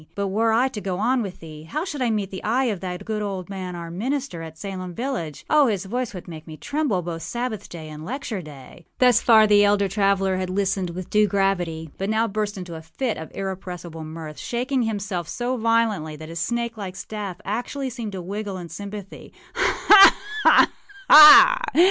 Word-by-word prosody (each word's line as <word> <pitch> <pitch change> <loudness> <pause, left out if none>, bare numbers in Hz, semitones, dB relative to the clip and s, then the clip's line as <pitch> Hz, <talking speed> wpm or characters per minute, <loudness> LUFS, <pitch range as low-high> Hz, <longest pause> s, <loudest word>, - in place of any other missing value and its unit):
But, 200 -1 -2
were 225 +3 +1
I 240 +4 +3
to 215 -5 -7
go 185 -2 -3
on 245 +5 +1
with 195 -4 -7
thee, 155 -2 -10
how 300 - -4
should 295 -7 -5
I 245 - +1
meet 210 -3 -2
the 190 - -7
eye 240 +5 +1
of 215 -7 -1
that 180 +1 -6
good 215 -1 -3
old 195 -2 -5
man, 185 -2 -6
our 170 -1 -7
minister, 250 0 -3
at 160 -1 -9
Salem 185 -2 -6
village? 235 - -4
Oh, 300 -2 +4
his 205 -4 -2
voice 245 +4 -3
would 180 - -9
make 160 -2 -10
me 155 -1 -9
tremble 280 - -1
both 165 -1 -5
Sabbath 240 -1 -5
day 160 -2 -9
and 155 0 -9
lecture 235 - -5
day.â 150 +1 -13
Thus 250 -3 +4
far 220 -2 +6
the 205 -1 +5
elder 205 -1 +3
traveller 195 -1 +1
had 185 -1 -3
listened 190 -1 -1
with 180 +1 -8
due 210 0 +4
gravity; 175 -5 -1
but 195 +1 -2
now 220 +1 +1
burst 210 0 -3
into 180 -2 -7
a 160 - -8
fit 220 +9 -3
of 160 - -8
irrepressible 180 -4 -6
mirth, 155 -1 -8
shaking 255 +2 -2
himself 200 -6 -3
so 245 +6 -3
violently 225 -9 0
that 155 +1 -10
his 165 0 -6
snake 235 +5 -2
like 190 -3 -6
staff 200 -2 -6
actually 250 +5 -3
seemed 230 -4 -6
to 185 - -5
wriggle 200 +2 -5
in 175 -2 -8
sympathy. 200 0 -9 0.2
âHa! 395 -1 +6 0.3
ha! - - +6 0.4
ha! 310 +12 +10
200 Hz, 205 wpm, -23 LUFS, 175-230 Hz, 0.4 s, ha